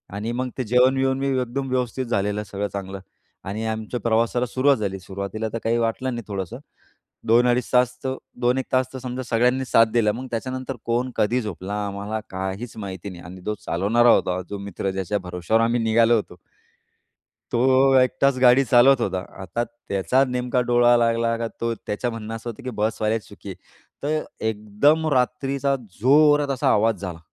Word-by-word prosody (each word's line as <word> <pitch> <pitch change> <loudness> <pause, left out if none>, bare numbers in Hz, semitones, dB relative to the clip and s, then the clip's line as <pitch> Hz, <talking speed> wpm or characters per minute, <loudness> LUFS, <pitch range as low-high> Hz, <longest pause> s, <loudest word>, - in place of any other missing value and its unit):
आणि 105 +3 -3
मग 125 +2 -2
ते 130 - -1
जेवण-बिवण 130 +3 +3
मी 135 - -1
एकदम 130 +2 -3
व्यवस्थित 130 0 -1
झालेलं 105 -2 -1
सगळं 105 0 -4
चांगलं 95 -1 -5 0.4
आणि 105 +3 -4
आमच्या 110 +2 -3
प्रवासाला 115 +2 +1
सुरुवात 130 +3 +2
झाली. 100 -3 -3
सुरुवातीला 100 +4 -5
तर - - -1
काही 115 +1 +1
वाटलं 120 +3 -1
नाही 120 - -5
थोडंसं 95 -4 -5 0.7
2 120 +2 +5
अडीच 125 0 +1
तास 125 0 +3
तर 130 0 -1 0.3
2 125 +1 +2
एक 130 - -1
तास 130 0 +3
तर 130 - -6
समजा 130 0 -5
सगळ्यांनी 125 +3 +1
साथ 115 -2 +5
दिला 110 -3 +3
मग 125 +4 -6
त्याच्यानंतर 130 +3 -4
कोण 120 +2 0
कधी 120 +4 +2
झोपला 100 -1 -5
आम्हाला 100 +2 -4
काहीच 95 +5 -5
माहिती 100 -2 -6
नाही. 90 -2 -10
आणि 90 +1 -10
तो 105 - 0
चालवणारा 105 +8 +2
होता, 90 -4 +2
जो 100 - -4
मित्र 100 0 -4
ज्याच्या 95 +2 -2
भरवश्यावर 90 +4 0
आम्ही 120 +1 +1
निघालो 115 +1 +4
होतो. 100 -5 -4 1.2
तो 130 +2 +4
एकटाच 130 +1 +2
गाडी 125 +2 +6
चालवत 130 +1 +5
होता. 95 -5 -1 0.2
आता 115 +6 -2
त्याचा 120 +1 0
नेमका 125 0 0
डोळा 120 0 +5
लागला 115 0 +1
का, 115 - -2
तो 115 0 0
त्याच 105 +1 -7
म्हणणं 115 -2 -3
असं 115 +1 -6
होतं, 115 +4 -11
की 130 - -4
बसवाल्याची 110 0 -1
चुकी 100 0 -12
आहे. 95 - -5 0.5
तर 155 +2 -1 0.2
एकदम 110 +9 +1
रात्रीचा 135 +2 0 0.2
जोरात 145 +3 +5
असा 130 - 0
आवाज 110 +2 +2
झाला 90 -4 -5
115 Hz, 175 wpm, -23 LUFS, 105-125 Hz, 1.2 s, गाडी